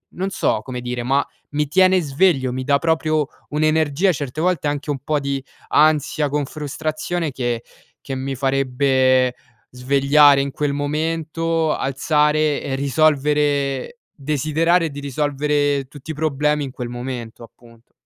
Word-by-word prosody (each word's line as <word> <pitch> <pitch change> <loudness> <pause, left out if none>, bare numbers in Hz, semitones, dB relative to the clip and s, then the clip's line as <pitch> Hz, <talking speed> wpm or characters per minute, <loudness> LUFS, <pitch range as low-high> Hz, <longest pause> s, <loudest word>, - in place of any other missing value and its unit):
non 190 +2 -2
so - - 0
come 125 -2 -6
dire 125 0 -4
ma 135 +3 +1 0.3
mi 150 0 0
tiene 185 +4 +4
sveglio, 140 -3 +1
mi 130 +1 -3
dà 140 0 +3
proprio 155 -2 +1 0.2
un'energia 155 +3 +2
certe 145 0 -4
volte, 175 -4 +1
anche 145 +1 -3
un 140 - -3
po' 150 0 0
di 140 -1 -3 0.3
ansia 150 -1 +2
con 145 0 -1
frustrazione 155 +3 -3
che 120 -3 -2 0.4
che 135 - -5
mi 135 +1 -3
farebbe 130 -1 +2 0.4
svegliare 140 +2 +4
in 140 0 -3
quel 145 +1 -1
momento, 160 +2 -1
alzare 150 +2 +1
e 135 - -2
risolvere 145 - +1 0.2
desiderare 155 +4 +1
di 140 - -7
risolvere 145 0 0
tutti 145 +3 -10
i - - -4
problemi 150 -1 0
in 135 - -7
quel 125 -1 -6
momento, 120 -2 -6
appunto. 115 0 -18
145 Hz, 140 wpm, -20 LUFS, 135-155 Hz, 0.4 s, tiene